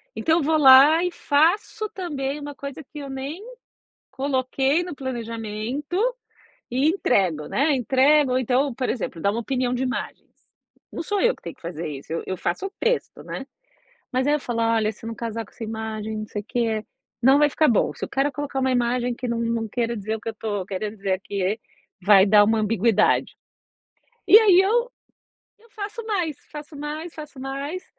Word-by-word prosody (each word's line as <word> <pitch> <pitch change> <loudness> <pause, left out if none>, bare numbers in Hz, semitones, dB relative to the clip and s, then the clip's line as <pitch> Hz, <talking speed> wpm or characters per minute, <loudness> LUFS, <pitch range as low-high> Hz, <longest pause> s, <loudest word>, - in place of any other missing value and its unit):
então 320 +1 +2
eu 335 - 0
vou 315 +2 +2
lá 290 +4 +8
e 360 - 0
faço 345 +8 +1
também 295 -6 -4
uma 290 0 -7
coisa 280 +2 -7
que 295 +2 -11
eu 280 -1 -7
nem 275 +8 -6 0.7
coloquei 265 +3 0
no 355 -3 -6
planejamento, 235 +3 -4 0.7
e 260 +4 +1
entrego, 190 - +1
né, 285 +3 +2
entrego 270 +3 +3
ou 255 - +3
então, 260 +2 +1
por 255 +1 -2
exemplo, 195 -8 -3
dar 200 - +1
uma 230 - -2
opinião 250 0 -1
de 250 - -2
imagens, 260 -1 -4 0.6
não - - -4
sou 410 +3 -1
eu 485 +1 +3
que - - -25
tenho - - -7
que - - -28
fazer 170 -1 -5
isso 145 +2 -7
eu 165 - -2
eu 185 - -3
faço 175 - -2
o 390 - -6
texto, 485 0 -1
né, 270 - -6 0.7
mas 260 +2 +1
aí 290 - +3
eu 300 - 0
falo: 240 -3 -3
"Olha 225 -1 +2
se 225 - -12
não 230 - -4
casar 230 0 -4
com - - -20
essa 235 - -11
imagem 220 0 -4
não 215 - -5
sei 205 - -5
o - - -29
que, 225 -2 -1 0.4
não 265 +3 +6
vai 295 0 +5
ficar 310 +2 +3
bom, 225 - +2
se - - -5
o - - -7
cara 275 +2 0
colocar 290 -1 -4
uma 260 0 +1
imagem 245 0 0
que 245 +1 -5
não 235 0 -1
não 230 -1 -1
queira 235 +1 -2
dizer 215 +1 -3
o 220 - -12
que - - -6
eu - - -2
estou, 205 -3 -4
queira 200 +2 -3
dizer 195 -3 -3
aqui, 195 +2 -2 0.4
vai 195 +1 +6
dar 205 +1 +7
uma 220 +2 +2
ambiguidade", 215 0 +2 0.9
e 430 - +10
aí 390 -5 +6
eu 470 +5 +1 0.7
eu 460 +1 -24
faço 420 +2 -6
mais, 355 - -1
faço 300 0 -9
mais, 305 +3 -6
faço 300 -3 -10
mais 280 +7 -5
260 Hz, 200 wpm, -23 LUFS, 220-295 Hz, 0.9 s, e